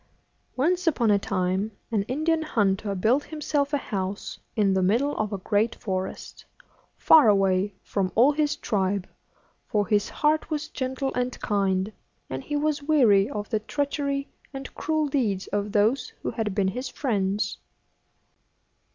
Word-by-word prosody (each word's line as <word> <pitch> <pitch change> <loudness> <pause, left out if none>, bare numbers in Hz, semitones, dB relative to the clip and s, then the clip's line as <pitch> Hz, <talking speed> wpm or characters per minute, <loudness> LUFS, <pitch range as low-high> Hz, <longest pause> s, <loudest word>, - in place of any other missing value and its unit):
Once 350 +7 +1
upon 240 -8 +3
a 200 - +4
time 190 +2 -1 0.2
an 215 -3 +2
Indian 315 +5 +1
hunter 205 -8 0
built 235 +10 +2
himself 295 -2 -1
a 290 - +2
house 195 -6 -4 0.2
in 205 -4 +3
the 190 - +2
middle 235 +10 +2
of 215 -1 -2
a 200 - -2
great 210 +4 0
forest, 190 -2 -5 0.5
far 300 -8 +7
away 195 0 +2
from 190 -2 -1
all 250 +6 +6
his 295 0 0
tribe; 195 -2 -1 0.6
for 205 -1 +1
his 205 0 +1
heart 310 +1 +1
was 305 -1 -3
gentle 265 +1 -3
and 250 0 -2
kind, 195 -1 0 0.4
and 130 0 -4
he 295 - -3
was 295 0 0
weary 245 -10 +4
of 205 -1 -5
the 220 - +1
treachery 280 +3 -2 0.2
and 270 -1 -8
cruel 310 -1 0
deeds 220 -9 0
of 205 0 -2
those 220 +5 +1
who - - -1
had 210 -4 -3
been 195 -2 +2
his 250 +7 -4
friends. 205 -6 -1
220 Hz, 150 wpm, -26 LUFS, 200-285 Hz, 0.6 s, far